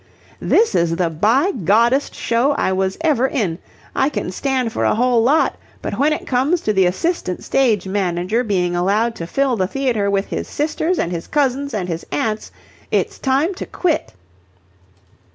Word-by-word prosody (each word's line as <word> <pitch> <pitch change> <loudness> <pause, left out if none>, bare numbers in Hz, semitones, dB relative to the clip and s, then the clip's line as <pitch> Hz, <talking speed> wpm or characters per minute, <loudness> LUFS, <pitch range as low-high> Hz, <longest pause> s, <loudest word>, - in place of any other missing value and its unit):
"This 455 0 +3
is 170 -1 +2
the 170 -1 0
by 225 - +2
Goddest 235 - +2
show 240 +5 +1
I 190 - 0
was 190 0 -1
ever 285 -6 +2
in! 205 - -2 0.4
I 270 - +2
can 230 - -3
stand 255 +1 -1
for - - -1
a - - +2
whole 245 0 +3
lot, 280 +7 +2 0.2
but - - -5
when 295 +3 +3
it 305 - -2
comes 275 +7 +1
to 215 - 0
the 190 -2 +4
assistant 185 - -2
stage 225 -8 +1
manager 190 +3 0
being 180 -5 0
allowed 205 +6 +1
to 165 - -5
fill 270 +5 +1
the 185 -4 0
theatre 235 -4 0
with 200 0 +1
his - - -3
sisters 315 +4 -1
and 170 - -1
his 170 -2 -5
cousins 280 -1 0
and 200 -6 -3
his 165 -1 -4
aunts 215 +9 -2 0.4
it's - - -1
time 280 +7 +1
to 375 - -7
quit." 345 -4 -1
230 Hz, 175 wpm, -19 LUFS, 190-275 Hz, 0.4 s, the